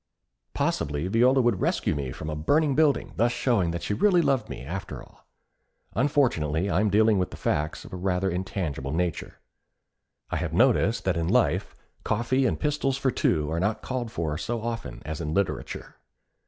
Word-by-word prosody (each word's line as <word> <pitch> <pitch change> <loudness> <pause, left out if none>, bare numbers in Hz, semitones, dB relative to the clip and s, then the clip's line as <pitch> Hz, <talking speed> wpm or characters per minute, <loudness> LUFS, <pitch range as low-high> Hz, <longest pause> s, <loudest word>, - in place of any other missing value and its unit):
Possibly 75 +4 -1
Viola 125 +6 +4
would 120 -6 +1
rescue - - +1
me 70 -3 -3
from 75 +2 -7
a 80 - -3
burning 145 - +2
building, 150 0 +2
thus 120 +1 +3
showing 115 -10 +1
that 85 0 -4
she - - -1
really 175 - +4
loved 135 -2 +1
me, - - -7
after 95 +6 -5
all. - - -21 0.7
Unfortunately 100 - +1
I 90 - +2
am 105 0 +2
dealing 105 0 +4
with 90 - -1
facts 75 +1 -2
of - - -12
a - - -4
rather 90 +1 0
intangible 90 -7 -3
nature. 85 -1 -2 0.9
I - - 0
have - - -3
noticed 115 +4 +3
that 95 -2 +1
in 85 -1 -1
life - - +1 0.3
coffee 125 +4 +1
and - - -1
pistols 145 -3 0
for 135 -1 +1
two 75 -8 +1
are 80 - -1
not 105 +4 -1
called 125 -3 -3
for 80 -5 -2
so 115 +3 -3
often 115 - -5
as 80 +2 -4
in 75 0 -3
literature. 100 -2 -3
95 Hz, 180 wpm, -26 LUFS, 80-120 Hz, 0.9 s, Viola